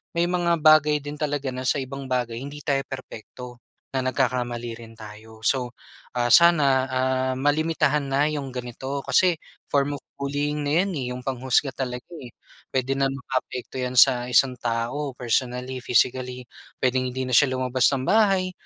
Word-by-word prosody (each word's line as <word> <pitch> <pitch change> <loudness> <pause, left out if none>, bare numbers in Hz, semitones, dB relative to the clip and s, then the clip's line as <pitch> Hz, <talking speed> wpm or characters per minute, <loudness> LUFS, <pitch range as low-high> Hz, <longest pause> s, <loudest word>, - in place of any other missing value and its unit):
May 170 +1 +2
mga 170 -2 +1
bagay 150 -2 +5
din 145 0 -7
talaga 145 -3 -2
na 130 0 -4
sa - - +3
ibang 135 +1 -7
bagay 120 -3 -2
hindi 145 +3 -8
tayo 135 -1 0
perpekto. 125 -1 -9 0.4
Na 130 - 0
nagkakamali 120 -3 -1
rin 115 -1 -12
tayo. 110 0 -12
So, 125 +2 0 0.5
ah, 120 - +2
sana, 140 -3 +5
ah, 130 0 0
malimitahan 150 +1 +1
na 140 +2 +2
'yong 145 -3 -4
ganito 125 +2 -5
kasi 180 -4 +3 0.3
form 145 0 +1
of - - -45 0.2
bullying 145 +2 -2
na 160 +5 +3
'yan, 200 - -3
eh. - - -3
'Yong 125 0 -6
panghusga 130 +1 0
talaga, 125 -2 -5
eh. 125 -2 -10 0.4
Puwede 130 0 -1
nang 135 0 +1
makaapekto 130 -1 -4
'yan 125 0 -3
sa 125 0 +5
isang 125 +1 +3
tao 120 +5 -2
personally, 125 +1 -2
physically. 125 +1 +1 0.4
Puwedeng 130 0 +1
hindi 130 +1 -3
na - - -4
siya 135 +2 +5
lumabas 130 -1 +2
ng 135 -2 -1
bahay. 195 -2 +3
130 Hz, 165 wpm, -24 LUFS, 125-145 Hz, 0.5 s, bagay